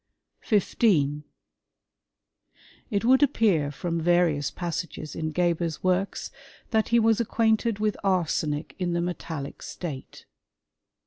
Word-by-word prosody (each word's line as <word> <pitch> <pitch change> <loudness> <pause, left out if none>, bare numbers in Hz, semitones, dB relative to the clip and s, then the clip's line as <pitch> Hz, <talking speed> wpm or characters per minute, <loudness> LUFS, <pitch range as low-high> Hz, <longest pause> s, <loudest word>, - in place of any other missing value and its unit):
"|| - - -55
15. 155 -8 +1 1.6
It 205 -1 -1
would 260 +3 +5
appear 205 - +3
from 165 +3 -3
various 165 -4 +2
passages 170 -3 -5
in 155 -1 -3
Geber's 170 -1 0
works 185 +2 0 0.4
that 220 -2 +2
he 235 - +3
was 225 0 +3
acquainted 225 -1 +1
with 210 0 0
arsenic 165 -5 0
in 175 -2 -1
the 170 - 0
metallic 165 -5 -5
state. 145 -7 -7
175 Hz, 115 wpm, -26 LUFS, 155-210 Hz, 1.6 s, would